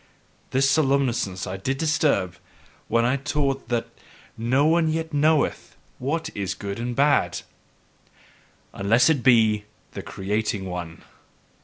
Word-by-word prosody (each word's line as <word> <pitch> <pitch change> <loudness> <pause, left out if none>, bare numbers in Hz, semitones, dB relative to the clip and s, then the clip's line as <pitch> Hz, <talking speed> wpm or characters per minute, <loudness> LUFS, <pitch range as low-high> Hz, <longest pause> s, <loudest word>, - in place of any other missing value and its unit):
This 135 +1 +2
somnolence 140 -3 +2 0.2
did 95 +8 -3
I - - -12
disturb 150 - +1 0.5
when 115 +1 +2
I 130 +3 +2
taught 140 -2 -2
that 120 -1 0 0.5
NO 125 +5 +1
ONE 165 +1 +3
YET 160 0 -2
KNOWETH 150 +1 +1 0.2
what 155 +6 -2
is 100 -2 -3
good 100 +1 -6
and 120 +1 -3
bad: 140 - +2 1.3
unless 115 +9 +3
it 145 -5 0
be 110 -4 +4 0.3
the - - -6
creating 105 0 -2
one! 85 -3 -6
125 Hz, 125 wpm, -24 LUFS, 105-145 Hz, 1.3 s, be